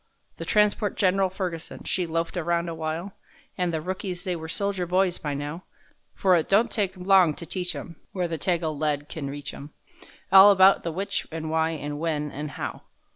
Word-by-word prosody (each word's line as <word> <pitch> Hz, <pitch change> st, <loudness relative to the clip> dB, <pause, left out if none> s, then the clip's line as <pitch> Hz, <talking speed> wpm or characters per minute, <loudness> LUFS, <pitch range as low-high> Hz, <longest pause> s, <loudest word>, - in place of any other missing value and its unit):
The -, -, -6 dB
transport 210 Hz, -1 st, +2 dB
Gen'ral 190 Hz, 0 st, +3 dB
Ferguson, 180 Hz, -3 st, -5 dB
she 180 Hz, -2 st, -1 dB
loafed 165 Hz, +2 st, -2 dB
around 170 Hz, 0 st, 0 dB
awhile, 165 Hz, +3 st, -4 dB, 0.4 s
An' 180 Hz, -2 st, 0 dB
the 160 Hz, -2 st, -2 dB
rookies 185 Hz, 0 st, -4 dB
they 185 Hz, -3 st, -1 dB
was 160 Hz, -1 st, -6 dB
soldier 200 Hz, -2 st, -1 dB
boys 180 Hz, 0 st, +1 dB
by 145 Hz, -2 st, -3 dB
now, 145 Hz, +5 st, -5 dB, 0.5 s
For 185 Hz, -2 st, +4 dB
it 165 Hz, -, 0 dB
don't 215 Hz, +4 st, +4 dB
take 195 Hz, -3 st, -1 dB
long 180 Hz, -4 st, +4 dB
to 170 Hz, -, -6 dB
teach 180 Hz, +2 st, -3 dB
'em—where 175 Hz, +2 st, -5 dB
the 165 Hz, -2 st, -4 dB
Tagal 165 Hz, -2 st, 0 dB
lead 145 Hz, -1 st, -1 dB
can 145 Hz, -4 st, -5 dB
reach 145 Hz, +1 st, -6 dB
'em— 145 Hz, +2 st, -10 dB, 0.6 s
All 195 Hz, +1 st, +10 dB
about 195 Hz, -1 st, +6 dB
the 170 Hz, -, -2 dB
which 200 Hz, +4 st, -3 dB
and 160 Hz, 0 st, -4 dB
why 160 Hz, 0 st, +2 dB
and 145 Hz, -1 st, -5 dB
when 150 Hz, -2 st, -2 dB
and 150 Hz, +2 st, -5 dB
how. -, -, -5 dB
170 Hz, 185 wpm, -26 LUFS, 160-190 Hz, 0.6 s, All